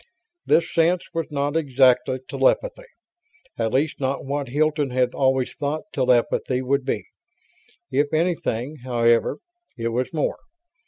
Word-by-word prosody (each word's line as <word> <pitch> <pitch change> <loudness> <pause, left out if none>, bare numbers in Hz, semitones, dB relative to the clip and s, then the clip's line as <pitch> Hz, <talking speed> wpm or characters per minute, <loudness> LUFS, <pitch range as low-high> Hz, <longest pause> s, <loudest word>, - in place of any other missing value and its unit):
This 165 - +2
sense 170 +2 +2
was 165 -1 -2
not 145 +1 -1
exactly 130 -3 +3
telepathy; - - 0 0.7
at 110 -1 0
least 145 +5 0
not 135 0 -2
what 140 0 -2
Hilton 150 +2 +1
had 125 0 +1
always 130 -1 +1
thought 150 +2 -3
telepathy 125 0 +1
would 140 +1 +1
be. - - -2 0.9
If 145 +2 +1
anything, 155 -5 -1
however, 120 -2 +1 0.4
it 115 0 -2
was 125 +2 -2
more. 155 -3 -1
140 Hz, 125 wpm, -23 LUFS, 125-155 Hz, 0.9 s, exactly